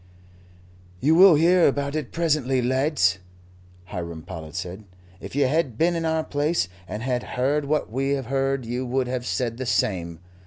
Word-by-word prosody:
"You 150 - +3
will 180 0 +8
hear 170 +3 +5
about 140 +1 -1
it 155 -4 -3
presently, 150 -6 +1
lads," 130 - +1 0.7
Hiram 85 -4 -6
Powlett 80 -2 -9
said. 90 +3 -6 0.3
"If - - -9
you 145 - +3
had 135 -4 0
been 170 +4 +2
in 165 -1 -2
our 160 0 0
place, 145 - 0 0.2
and 105 +4 -5
had 125 -1 0 0.2
heard 140 +3 +1
what 150 -5 -1
we 135 +3 0
have 135 -2 -2
heard, 135 0 -1
you 120 +2 -3
would 130 +1 0
have 125 -1 -3
said 120 -2 -2
the 130 -1 -4
same. 85 -8 0
130 Hz, 170 wpm, -24 LUFS, 115-150 Hz, 0.7 s, will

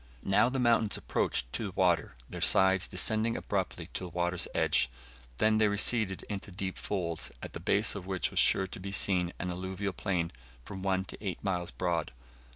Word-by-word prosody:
Now 105 +5 +4
the 135 - -2
mountains 115 -4 +3
approached - - -1
to - - -1
the - - -4
water, - - +2
their - - -7
sides 95 -1 +5
descending 110 +5 0
abruptly 95 -4 -2
to 95 - -4
the - - -7
water's 90 +1 -1
edge; 65 - +3 0.5
then 110 0 +3
they 110 - +5
receded 100 -1 +1
into 100 -1 -6
deep 95 0 -4
folds, 85 -5 -3
at - - -7
the - - -5
base 105 +2 +2
of 95 -3 -7
which 95 -3 -1
was - - +1
sure 95 - +5
to 95 - -8
be 100 +1 -5
seen 90 -3 +2
an 90 - -3
alluvial 95 +2 -3
plain 90 -5 -1 0.3
from 95 -2 -7
one 95 0 0
to - - -10
eight 95 -5 -4
miles 90 -3 -1
broad. 85 -7 -1
95 Hz, 190 wpm, -31 LUFS, 90-100 Hz, 0.5 s, sides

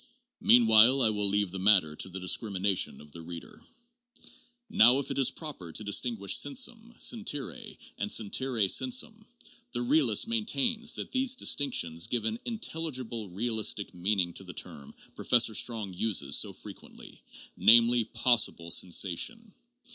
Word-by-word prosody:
Meanwhile 120 +2 +5
I 110 - +3
will 105 -1 0
leave 100 -2 0
the 95 - -6
matter 95 -6 +3
to 95 - -5
the 95 - -8
discrimina 95 +1 -1
tion - - 0
of 75 0 -16
the 85 - -9
reader. 85 0 -11 1.0
Now 120 +4 +5
if 140 - -3
it - - -2
is 135 - +3
proper 140 - -8
to 110 - -4
distinguish 105 -1 0
sensum, 240 -3 -2
sentire 210 - -2 0.2
and - - -3
sentire 115 0 0
sensum, 230 - 0 0.5
the - - -2
realist 290 -1 +2
maintains 230 +1 -1
that - - -7
these 260 -1 +1
distinctions 85 - 0
give 120 -3 -2
an 110 +1 -2
in 230 -2 -4
telligible 130 - -4
realistic 110 0 -2
meaning 90 -1 -1
to - - -6
the - - -11
term 70 -1 -8 0.2
Professor 120 -2 +1
Strong 110 -4 -2
uses 90 -8 0
so - - +3
frequently, - - -12 0.3
namely, 115 +1 +5
'possible 115 -7 +1
sensation.' 100 - 0
115 Hz, 145 wpm, -28 LUFS, 95-150 Hz, 1.0 s, Meanwhile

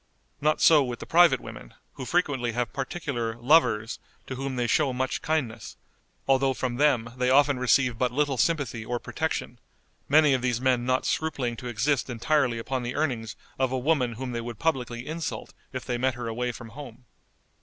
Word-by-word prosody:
Not 155 +1 +2
so 155 -3 +7
with 125 -2 -4
the - - -8
private 165 -6 +5
women, - - -11 0.2
who 130 - -7
frequently 135 -9 0
have 120 0 -2
particular 130 -5 -3
"lovers" 120 -4 +3 0.3
to - - -6
whom 135 0 -4
they 120 -1 0
show 135 +4 +2
much 130 +1 -2
kindness, 150 -8 -2 0.5
although 135 0 +3
from 120 -1 -3
them 125 -5 +2
they 125 0 +1
often 140 0 +4
receive 125 -1 +2
but 125 -1 +1
little 140 -1 0
sympathy 140 -9 0
or 120 +2 -2
protection, 150 -3 -4 0.5
many 150 0 +5
of 130 - +1
these 125 -2 0
men 125 -1 +1
not 130 0 +1
scrupling 135 -7 -1
to 125 - -7
exist 120 +4 0
entirely 125 0 +1
upon 130 +3 -3
the 120 +1 -4
earnings 125 -7 -2 0.2
of 130 -1 +1
a 130 - 0
woman 130 -3 +1
whom 125 +2 -5
they 120 -1 -3
would 120 -1 -7
publicly 125 -6 -2
insult 160 +1 -5 0.2
if 130 -1 -6
they 120 -2 -2
met 130 0 +1
her 120 -1 -5
away 120 +2 -2
from 115 -1 -10
home. 125 -1 -11
130 Hz, 185 wpm, -26 LUFS, 120-145 Hz, 0.5 s, so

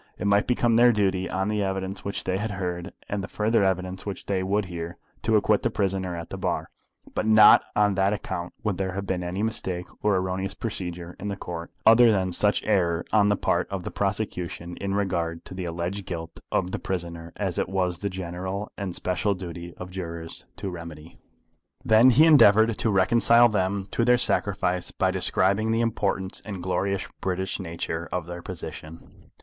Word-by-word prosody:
It - - -4
might 100 +1 +3
become 120 -2 +2
their 120 +1 +7
duty, 95 -4 0
on 95 +1 -1
the 105 0 0
evidence 95 0 -3
which 100 - -4
they 95 - -1
had 110 +2 -2
heard 90 -2 -4 0.2
and 100 -1 -3
the - - -5
further 110 +1 +1
evidence 95 0 -1
which 100 -3 -6
they 95 -2 0
would 100 +2 0
hear, 85 -1 -6 0.2
to 110 - +2
acquit 105 0 +3
the - - +1
prisoner 95 -3 -1
at 85 -1 -7
the 95 - -5
bar; 90 -2 -2 0.4
but 110 - -1
not 110 -1 +8
on 105 -1 +3
that 95 +1 +2
account 95 -4 -4
would 105 -4 -1
there 95 -1 -1
have 100 +1 -4
been 95 -2 -2
any 90 +4 -3
mistake 95 -5 -2 0.2
or 105 -1 +3
erroneous 95 +1 -2
procedure 90 -5 -5
in 105 - -5
the 100 - -2
Court, 85 -3 -6 0.2
other 115 +1 +7
than 95 -3 +1
such 105 +4 +2
error 90 -5 +1
on 105 -2 +5
the 100 - +3
part - - 0
of 95 -2 -4
the - - -5
prosecution 90 -3 -3
in 100 0 -2
regard 85 -4 -2
to - - -9
the 95 -1 -5
alleged 85 +3 -4
guilt 80 -2 -6
of 90 - 0
the - - -3
prisoner 85 -2 -5
as 95 -4 -2
it - - -1
was 90 -3 -1
the 100 - -2
general 95 +2 -5
and 95 -3 -4
special 95 +3 0
duty 85 -1 -7
of 90 0 -8
jurors 85 -3 -6
to 95 - -5
remedy. 85 -2 -10 0.7
Then 110 +4 +6
he 135 +6 +6
endeavoured 110 -8 +6
to 115 - +1
reconcile 115 +4 +5
them 100 -1 -1
to 115 - +1
their 125 +1 +5
sacrifice 100 -6 +2
by 95 -1 0
describing 95 +3 +1
the 115 +1 +2
importance 100 -4 -1
and 100 -5 -6
glorious 95 +1 -1
British 95 +1 -2
nature 85 -2 -4
of 90 -2 -2
their 85 0 -7
position. 80 -2 -9
95 Hz, 195 wpm, -25 LUFS, 90-105 Hz, 0.7 s, not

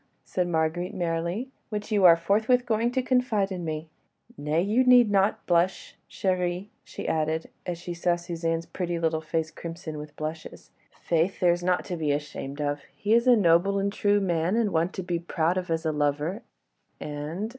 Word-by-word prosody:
said 180 -1 -1
Marguerite, 175 +3 -1
merrily, 175 +8 -2 0.2
"which 210 0 -5
you 205 -3 +4
are 170 -2 +9
forthwith 220 +8 +2
going 230 0 +1
to 260 0 0
confide 250 -6 +1
to 190 -2 -4
me. 160 -2 -4 0.5
Nay, 150 +3 -1
you 220 +6 +3
need 245 -4 +6
not 200 0 +2
blush, 175 +2 +1 0.2
chérie," 180 +1 -1
she - - -7
added, 160 0 -1 0.2
as 175 -1 -2
she 175 +1 -6
saw 175 0 +1
Suzanne's 165 -1 -3
pretty 175 0 -3
little 160 -1 0
face 160 0 -2
crimson 165 -1 -7
with 150 0 -9
blushes. 155 +1 -7 0.3
"Faith, 170 +3 +1
there's 175 -1 +3
naught 180 0 +1
to 180 -3 -4
be 155 -2 0
ashamed 145 -1 -4
of! 145 -1 -1 0.2
He 210 +1 +1
is 235 +2 +4
a 250 - +8
noble 195 0 +3
and 200 0 0
true 205 0 +2
man, 175 0 0
and 225 -3 +1
one 165 +2 +1
to 190 - -4
be 175 -1 -2
proud 170 0 0
of 185 -1 -3
as 165 0 -1
a 160 - +2
lover, 150 +7 -1 0.6
and 150 +8 -4
175 Hz, 185 wpm, -26 LUFS, 160-200 Hz, 0.6 s, are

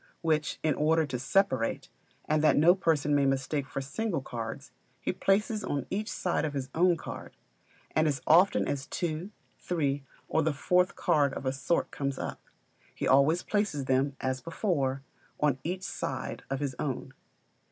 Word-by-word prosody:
which, 155 -2 0
in 155 -1 +3
order 160 +3 +2
to 125 -3 -4
separate, 135 -4 +1 0.4
and 155 0 +2
that 155 - +5
no 165 +4 +7
person 160 -6 +1
may 145 -1 +4
mistake 135 +1 -1
for 135 - -4
single 185 +6 -2
cards, 120 +4 -6 0.3
he - - -2
places 210 +3 +1
on 140 -1 -2
each 210 +3 -2
side 180 - -1
of 150 -2 -2
his 135 -1 -3
own 175 +1 +4
card; - - -8 0.6
and 155 0 +4
as 140 -3 0
often 175 +5 +5
as 140 -1 -2
two, 170 +1 -3 0.3
three, 145 -5 -1 0.2
or 160 - +2
the 160 -1 +1
fourth 180 +6 +2
card 140 -3 +2
of - - -6
a 130 - +1
sort 135 +5 0
comes 140 -1 -2
up, - - -5 0.5
he - - -2
always 140 +6 +4
places 205 -10 0
them, 135 +1 +1
as 130 0 -2
before, 140 - -1 0.4
on 145 -3 +2
each 180 +3 -3
side - - -4
of 135 +1 -2
his 140 -2 -1
own. 135 -2 -3
150 Hz, 170 wpm, -29 LUFS, 135-175 Hz, 0.6 s, no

